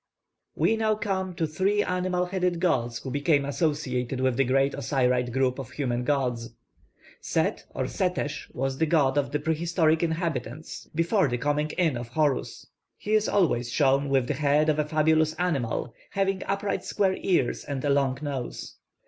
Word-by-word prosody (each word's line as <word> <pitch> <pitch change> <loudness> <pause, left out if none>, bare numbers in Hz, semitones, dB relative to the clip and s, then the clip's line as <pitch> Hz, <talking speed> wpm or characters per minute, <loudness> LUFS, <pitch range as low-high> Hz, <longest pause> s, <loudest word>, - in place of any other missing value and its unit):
We 225 - +2
now 220 -1 +2
come 190 -4 -2
to 165 - 0
three 190 +7 +1
animal 180 0 0
headed 180 -1 -1
gods 120 -10 +1
who 130 - -6
became 145 0 +2
associated 140 -4 -1
with 130 -1 +1
the 135 - +3
great 135 +2 +2
Osiride 125 -3 0
group 130 +1 +1
of 130 -2 -6
human 125 -4 -2
gods. 125 -4 -1 0.6
+Set+ - - -1
or - - -1
+Setesh+ - - -2
was 135 +1 -2
the 160 - +2
god 145 -4 +3
of 145 -1 0
the 150 - +1
prehistoric 160 +1 +1
inhabitants 160 -3 -3
before 170 +2 +2
the 120 -1 -1
coming 145 +3 0
in 160 -8 +2
of 120 0 -6
Horus. 140 +1 -1 0.3
He 210 - -3
is 215 0 +3
always 125 -11 +1
shown 140 0 +2
with 135 -2 +2
the - - 0
head 150 +1 +2
of 155 0 +1
a 150 - +2
fabulous 155 +1 +2
animal, 135 -9 -1 0.2
having 195 -1 0
upright 195 -1 -1
square 190 -2 0
ears 175 -10 +1
and 140 -1 -4
a 145 - +2
long 135 -2 +2
nose. 135 -4 -5
150 Hz, 170 wpm, -26 LUFS, 130-175 Hz, 0.6 s, the